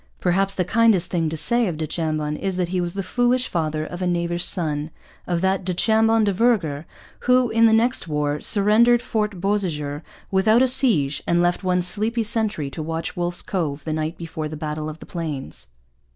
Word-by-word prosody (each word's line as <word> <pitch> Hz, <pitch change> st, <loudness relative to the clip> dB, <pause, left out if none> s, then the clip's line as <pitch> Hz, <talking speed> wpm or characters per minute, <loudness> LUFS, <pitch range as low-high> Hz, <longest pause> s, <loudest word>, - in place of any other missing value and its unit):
Perhaps 195 Hz, +2 st, +1 dB
the 180 Hz, -, 0 dB
kindest 220 Hz, -3 st, +2 dB
thing 165 Hz, -3 st, 0 dB
to 160 Hz, -, -5 dB
say 235 Hz, +7 st, +1 dB
of 170 Hz, -4 st, -3 dB
du 160 Hz, -, -2 dB
Chambon 155 Hz, -1 st, -2 dB
is 190 Hz, +2 st, -3 dB
that 180 Hz, -2 st, -1 dB
he 180 Hz, 0 st, -1 dB
was 175 Hz, 0 st, -4 dB
the 195 Hz, -, -2 dB
foolish 245 Hz, +5 st, +1 dB
father 155 Hz, -2 st, -2 dB
of 175 Hz, +3 st, -8 dB
a 180 Hz, -, 0 dB
knavish 175 Hz, 0 st, -1 dB
son 150 Hz, -3 st, +1 dB, 0.4 s
of 175 Hz, -1 st, -1 dB
that 190 Hz, 0 st, +1 dB
du 180 Hz, -1 st, -2 dB
Chambon 225 Hz, +2 st, +3 dB
de 200 Hz, -2 st, +1 dB
Vergor 180 Hz, -9 st, 0 dB, 0.4 s
who, 250 Hz, -1 st, +3 dB
in 230 Hz, 0 st, +5 dB
the -, -, +3 dB
next 230 Hz, -3 st, +2 dB
war, 150 Hz, -1 st, -1 dB
surrendered 230 Hz, +4 st, +4 dB
Fort 210 Hz, -5 st, -2 dB
Beausejour 165 Hz, -7 st, -2 dB, 0.3 s
without 215 Hz, +6 st, +4 dB
a -, -, +3 dB
siege 180 Hz, -, +3 dB
and 170 Hz, -, +2 dB
left 175 Hz, +2 st, +1 dB
one 180 Hz, -1 st, +1 dB
sleepy 215 Hz, +6 st, -1 dB
sentry 210 Hz, -10 st, -1 dB
to 160 Hz, -, -6 dB
watch 165 Hz, +1 st, -4 dB
Wolfe's 175 Hz, 0 st, -3 dB
Cove 150 Hz, -7 st, -3 dB
the 155 Hz, -, -3 dB
night 155 Hz, +2 st, -3 dB
before 160 Hz, -2 st, -5 dB
the 155 Hz, -, -7 dB
Battle 150 Hz, 0 st, -4 dB
of 155 Hz, -, -8 dB
the -, -, -12 dB
Plains. 140 Hz, -, -5 dB
175 Hz, 200 wpm, -22 LUFS, 155-215 Hz, 0.4 s, in